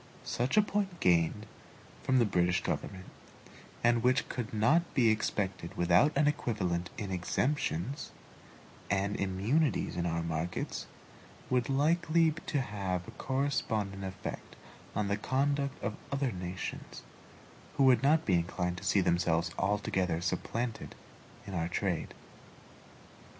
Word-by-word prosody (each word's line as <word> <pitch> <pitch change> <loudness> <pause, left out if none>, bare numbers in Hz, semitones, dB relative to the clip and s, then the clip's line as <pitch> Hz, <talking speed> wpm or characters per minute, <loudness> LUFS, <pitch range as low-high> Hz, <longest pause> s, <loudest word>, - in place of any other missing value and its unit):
Such 125 - -1
a 210 - +7
point 200 -4 -2
gained 85 +4 +2 0.6
from 130 -1 +2
the 120 - +5
British 90 -3 +1
government, 95 -1 -3 0.8
and 120 0 +4
which 130 +3 +2
could 120 -4 -4
not 145 +11 +2
be 120 -4 +5
expected 95 -5 -2
without 90 - +4
an 145 - +4
equivalent 95 -12 0
in 100 -2 -4
exemptions 120 - -1 0.8
and 100 +1 +1
immunities 105 +11 +1
in 85 0 -1
our 85 0 -1
markets, 85 +1 -3 0.6
would 125 -1 +3
be 135 - -1
likely 160 +3 +3
to 150 -2 -2
have 95 -6 -3
a - - -8
correspondent 110 -8 -1
effect 95 -1 -6 0.4
on 105 - 0
the 100 0 0
conduct 140 +4 0
of 110 -3 -2 0.2
other 140 -2 0
nations, 90 -1 -6 0.7
who 140 - +4
would 130 -2 +6
not 150 +4 +4
be 95 - +2
inclined 90 +1 0
to - - -13
see 100 - +3
themselves 85 -1 +1
altogether 95 -4 0
supplanted 115 +7 -3 0.5
in 100 - -7
our 85 -2 0
trade. 90 -1 -2
105 Hz, 130 wpm, -31 LUFS, 90-135 Hz, 0.8 s, a